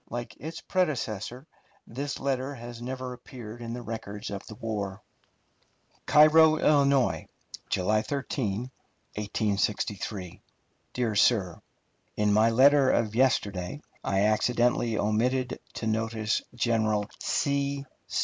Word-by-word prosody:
Like 120 +1 -5
its 160 +2 -7
predecessor, 130 - -2 0.4
this 140 +4 -5
letter 135 0 -1
has 120 -1 -9
never 130 0 -5
appeared 120 -2 -10
in 115 0 -5
the 120 0 -6
records 105 -3 -6
of 100 -1 -5
the 110 - -9
war: 105 -3 -4 1.0
CAIRO, 155 +1 +7
ILL., 140 -4 +3 0.4
July 105 +4 +2
13, 125 -3 -3 0.4
1863. 100 -2 -2 0.5
DEAR 120 -3 0
SIR: 100 -4 +2 0.6
In 105 -1 +2
my 110 +2 +5
letter 135 +3 +5
of 110 -2 +1
yesterday 105 -5 +1 0.2
I 95 0 +1
accidentally 120 +2 +2
omitted 125 +5 0 0.2
to - - -4
notice 110 0 0
General 110 -3 +1
C. 140 -1 0
115 Hz, 110 wpm, -28 LUFS, 105-130 Hz, 1.0 s, CAIRO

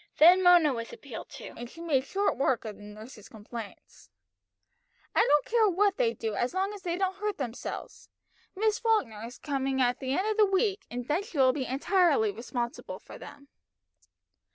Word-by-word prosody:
Then 355 +4 +7
Mona 350 -5 +6
was 230 -1 -5
appealed 255 -6 -9
to, - - -9
and 240 0 -8
she 330 - -14
made 305 -6 +1
short 400 +7 0
work 265 -3 0
of 215 -2 -6
nurse's 210 +1 -12
complaints. 220 0 -10 1.0
"I - - +2
don't 295 -9 +4
care 445 -2 +3
what 400 +2 +2
they 475 -2 +2
do 220 -2 -3
as 240 - -1
long 385 +2 0
as 410 - -9
they 345 -1 -2
don't 380 0 -1
hurt 420 -1 -2
themselves. 245 -4 -6 0.5
Miss 430 +2 +1
Falkner 280 - 0
is 235 +2 -8
coming 270 -2 -2
the 260 +1 0
end 375 - 0
of 435 0 -1
the 430 - +6
week, 390 +1 0
and 245 0 -5
then 305 +5 +1
she 400 -6 -9
will 260 -1 +5
be 265 -2 -3
entirely 285 - +2
responsible 235 +4 -5
for - - -13
them." 280 0 -12
285 Hz, 180 wpm, -29 LUFS, 240-385 Hz, 1.0 s, Then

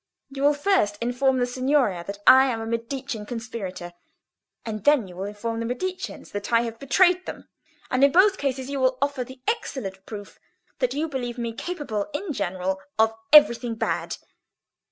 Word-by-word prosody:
You 270 0 -6
will 290 +1 +4
first 290 - +1
inform 250 +3 +1
the 245 - +2
Signoria 255 -7 +1
that 200 0 -6
I 260 +1 +8
am 235 -3 -1
a 225 - -4
Medicean 230 0 -4
conspirator, 205 -7 -6 0.7
and 215 -3 -5
then 290 -7 +4
you 180 - -12
will 190 +2 -4
inform 210 +3 -4
the 230 - -2
Mediceans 365 +10 -5
that 205 +2 -5
I 230 0 +5
have 230 -1 -5
betrayed 360 +7 +3
them, - - -8 0.4
and 255 +1 +2
in 280 - +6
both 385 +4 +5
cases 265 -2 -2
you 280 0 -3
will 260 -1 +2
offer 280 -2 0
the 260 +1 -13
excellent 200 - -3
proof 205 -2 -9 0.4
that - - 0
you 310 +3 -1
believe 250 -4 -4
me 235 -1 -3
capable 280 - -4
in 325 +1 -3
general 190 -3 -2 0.2
of 220 0 +4 0.2
everything 245 -6 +6
bad. - - -2
245 Hz, 175 wpm, -25 LUFS, 220-280 Hz, 0.7 s, I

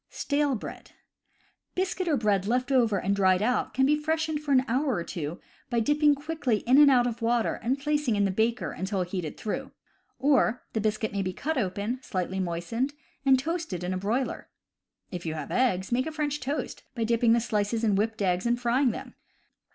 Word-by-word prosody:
Stale 285 -1 0
Bread. 210 - -8 0.4
— - - -40
Biscuit 370 0 -1
or 305 -4 +2
bread 205 -4 +1
left 250 +4 0
over 235 -6 +3
and 200 +2 0
dried 190 -1 +3
out 245 +2 0
can 265 +1 +4
be 295 +2 +4
freshened 315 0 -1
for 295 -1 -4
an 260 -1 +4
hour 260 +3 +1
or 175 - -2
two 165 -1 -5 0.3
by 240 -2 +1
dipping 295 +4 +3
quickly 285 -7 -1
in 255 +4 +5
and 295 -1 +8
out 250 -3 +5
of 240 -1 -3
water 235 0 +1
and 250 +4 0
placing 295 -4 0
in 205 0 +2
the 195 - +1
baker 225 +5 0
until 190 0 -2
heated 175 -3 -5
through; 215 - -4 0.5
or, 270 -4 +2
the 220 - 0
biscuit 215 +1 -1
may 200 -1 -1
be 185 -1 -2
cut 315 - -2
open, 210 +2 -2
slightly 190 -4 -3
moistened, 190 +11 -2 0.3
and 265 -1 +7
toasted 315 - -3
in 180 +1 -2
a - - -1
broiler. 230 +7 -2 0.6
If 180 -2 -5
you 160 - -2
have 150 -3 -6
eggs, 190 -7 +1
make 255 +4 +1
a - - -3
French 295 -1 -2
toast 285 +3 -4
by 230 - -1
dipping 230 0 +3
the 235 - +4
slices 220 0 -1
in 215 -2 +3
whipped 215 +1 0
eggs 185 +3 +1
and 240 +1 +1
frying 250 +2 +2
them. 220 - -6
235 Hz, 205 wpm, -27 LUFS, 200-275 Hz, 0.6 s, and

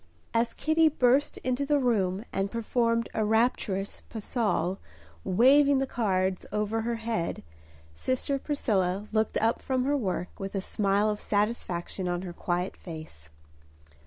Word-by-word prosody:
As 230 0 +1
Kitty 315 +1 +3
burst 270 0 +2
into 255 +2 0
the 290 +1 +2
room 210 -6 +1
and 195 +1 0
performed 230 +1 0
a 220 - 0
rapturous 210 -3 0
pas 220 -2 -7
seul, 205 -5 0 0.4
waving 270 +8 +5
the 270 - +1
cards 190 -7 0
over 210 +1 0
her 235 +1 -1
head, 225 -6 -3 0.5
sister 260 - -1
Priscilla 205 -10 0
looked 220 0 +1
up 225 +1 +1
from 260 -1 0
her 285 +2 +1
work 185 -8 -3
with 195 0 -5
a - - +1
smile 200 +1 +1
of 210 -1 -1
satisfaction 205 -4 -1
on 175 0 -1
her 180 -2 -6
quiet 175 +2 -2
face. 155 - -10
220 Hz, 145 wpm, -28 LUFS, 190-245 Hz, 0.5 s, waving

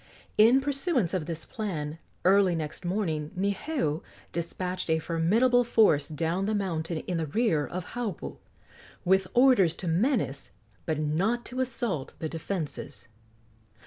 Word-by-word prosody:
In 235 +5 +6
pursuance 275 - 0
of 180 -5 -1
this 165 -1 -4
plan, 165 - -4 0.3
early 190 -1 +5
next 155 +2 -4
morning 175 -5 -1
Niheu 195 - -1 0.3
despatched 180 +2 -3
a 160 - +4
formidable 210 +11 +3
force 210 -11 +4
down 165 +5 -1
the 215 - +1
mountain 170 -4 -2
in 180 - -3
the 160 - -2
rear 160 -4 +1
of 180 0 -6
Haupu, 185 - -4 0.7
with 190 +1 +3
orders 240 -10 +5
to 180 - -5
menace 170 - 0 0.4
but 155 - 0
not 180 +11 0
to 255 - -6
assault 235 - -2
the 160 - -3
defences. 160 -6 -5
180 Hz, 135 wpm, -28 LUFS, 160-225 Hz, 0.7 s, In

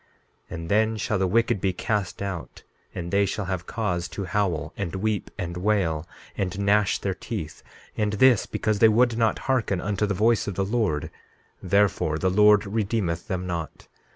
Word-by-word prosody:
16:2 - - -6
And 80 0 -6
then 110 +1 +2
shall 105 0 -1
the 95 - +2
wicked 115 -1 +1
be 95 -1 +1
cast 100 0 -2
out, 95 -4 -6 0.3
and 85 -1 -5
they 100 0 +3
shall 100 +1 -2
have 90 -1 -4
cause 90 -6 -2
to 100 +1 -5
howl, 90 -6 -1
and 95 -3 -4
weep, 105 +1 -1
and 90 -2 -4
wail, 90 -5 0 0.3
and 95 -1 -2
gnash 100 0 +3
their 95 - -2
teeth; 90 -3 -6 0.3
and 105 -1 0
this 120 +1 +4
because 110 -2 -1
they 115 - +7
would 120 +2 +3
not 115 -2 +2
hearken 120 -8 +1
unto 105 +2 -1
the 100 - -1
voice 110 +3 +2
of 100 - -3
the 95 - 0
Lord; 105 -8 -1 0.5
therefore 95 -5 +2
the 95 +3 +1
Lord 105 +1 +5
redeemeth 100 -5 -1
them 90 -1 -3
not. 85 -3 -5
100 Hz, 180 wpm, -25 LUFS, 90-105 Hz, 0.5 s, they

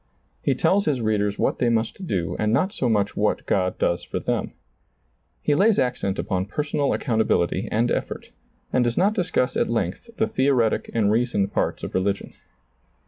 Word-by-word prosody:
He - - +1
tells 200 +1 +2
his 145 -4 +1
readers 105 -2 0
what - - 0
they 120 - +2
must 115 +11 -1
do 85 - -1
and 105 0 +1
not 185 - +1
so 125 - 0
much 105 -2 +1
what 105 +1 0
God 90 -1 0
does 85 - 0
for - - -4
them. - - -2 0.9
He 150 - +2
lays 200 +7 +4
accent 105 -6 0
upon 95 -1 -2
personal 145 +3 -1
accountability 110 - +1
and 115 +3 +1
effort, - - -3 0.4
and 125 - +3
does 120 -1 -1
not 200 +4 +3
discuss 175 - 0
at - - +1
length 115 - -2
the 220 - +2
theoretic 130 - +1
and 105 -3 +3
reasoned 110 -4 +1
parts - - -1
of - - -5
religion. 100 +1 -1
115 Hz, 175 wpm, -24 LUFS, 100-140 Hz, 0.9 s, lays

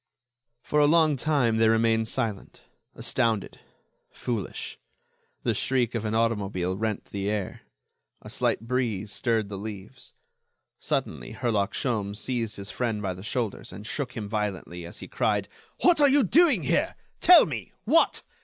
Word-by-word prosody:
For 150 - +1
a 145 - +6
long 160 -1 +4
time 130 -5 +1
they 110 0 +4
remained 115 0 +2
silent, 115 -5 -3 0.3
astounded, 115 -5 -1 0.5
foolish. 115 -6 -4 0.6
The - - +1
shriek 125 -3 0
of 115 -2 -2
an 110 +1 -1
automobile 100 -5 0
rent 110 +1 -2
the 100 0 -2
air. 105 -3 -3 0.6
A - - -10
slight - - 0
breeze 115 -4 -2
stirred 115 -1 0
the 100 -2 -5
leaves. 110 +4 -9 0.6
Suddenly, - - -3
Herlock 110 -4 0
Sholmes 105 -7 -1
seized 115 -2 -2
his 100 0 -6
friend 115 -4 -1
by 95 -3 -2
the 90 - -10
shoulders 115 0 -3
and 100 +3 -9
shook 130 +1 -3
him 105 -2 -4
violently, 95 -5 -3
as 85 - -9
he - - -7
cried: - - 0 0.3
"What 345 -4 +5
are 285 - +7
you 280 0 +5
doing 325 - +4
here? - - +1 0.2
Tell 360 - +8
me.... - - -5
What?... - - +3
110 Hz, 155 wpm, -26 LUFS, 100-125 Hz, 0.6 s, Tell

